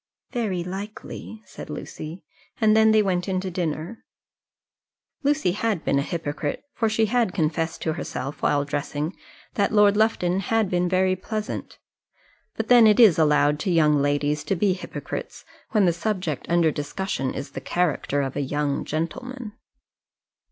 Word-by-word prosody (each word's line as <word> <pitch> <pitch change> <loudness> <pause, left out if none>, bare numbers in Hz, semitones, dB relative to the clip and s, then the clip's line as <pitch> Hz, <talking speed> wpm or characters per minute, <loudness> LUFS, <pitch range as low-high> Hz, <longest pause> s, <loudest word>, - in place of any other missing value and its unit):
"Very 205 -8 -1
likely," 205 +3 -7
said - - -10
Lucy; 160 +4 -7 0.4
and 215 -1 +4
then 220 0 +6
they 215 -1 +5
went 180 -2 0
in 185 -1 0
to 190 -1 -4
dinner. 170 +4 -3 1.2
Lucy 290 - +2
had 210 -2 -1
been 140 - +2
a - - +2
hypocrite, 145 -2 -3
for 225 - 0
she 220 +1 +2
had 225 -3 +1
confessed 160 -1 -1
to 160 - 0
herself, 135 -1 -5
while 145 -1 +2
dressing, 145 +3 -3 0.4
that 200 - +1
Lord 205 -1 +5
Lufton 195 -4 +2
had 215 0 0
been 180 0 +1
very 185 0 +2
pleasant; 215 +3 -5 0.8
but - - -3
then 240 -3 +7
it 210 +1 +4
is 210 -9 +7
allowed 150 -1 +3
to 185 - -2
young 150 -3 +4
ladies 145 +1 0
to 195 - 0
be 190 +1 +2
hypocrites 180 - -7 0.2
when 210 -3 +3
the 175 - +3
subject 175 -5 -3
under 170 -2 +3
discussion 145 -1 -3
is 140 - -5
the - - -6
character 150 -4 0
of 135 -1 -4
a 145 - -1
young 145 +1 -1
gentleman. 225 - -4
180 Hz, 160 wpm, -24 LUFS, 150-215 Hz, 1.2 s, then